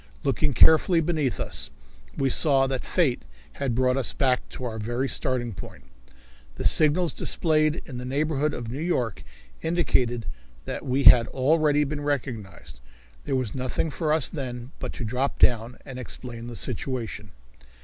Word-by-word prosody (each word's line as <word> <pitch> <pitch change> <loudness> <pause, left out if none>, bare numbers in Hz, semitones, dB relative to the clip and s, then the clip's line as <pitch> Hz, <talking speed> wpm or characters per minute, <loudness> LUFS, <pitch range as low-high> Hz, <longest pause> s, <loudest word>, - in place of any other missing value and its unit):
Looking 145 0 0
carefully 165 - +6
beneath 155 -6 -1
us, - - -4 0.5
we 135 -1 +1
saw 135 -3 +4
that 135 -1 -2
fate 150 -9 +1 0.4
had 130 -4 0
brought 130 +1 +2
us 135 - +1
back 130 -2 +1
to - - -8
our 110 -2 -4
very 120 +5 -2
starting 125 -3 -1
point, - - -10 0.7
and - - -5
signals 160 +3 +3
displayed 155 -1 +1
in 125 -5 -7
the - - -6
neighborhood 150 +2 0
of 120 -4 -6
New 135 +5 -5
York 125 - -1 0.4
indicated 125 - +1 0.4
that - - -5
we 130 +2 +1
had 120 -3 +8
already 150 +2 +2
been 145 +1 -4
recognized. 115 - -4 0.5
There 135 - -1
was 125 -5 -2
nothing 130 +4 -2
for 155 +1 -1
us 155 -3 +3
then 125 -3 -6
but - - -4
to 125 - -5
drop 125 +5 -1
down 120 0 +2
and 135 -2 -7
explain 120 -1 -6
the 120 - -7
situation. 115 -3 -4
130 Hz, 160 wpm, -25 LUFS, 120-150 Hz, 0.7 s, had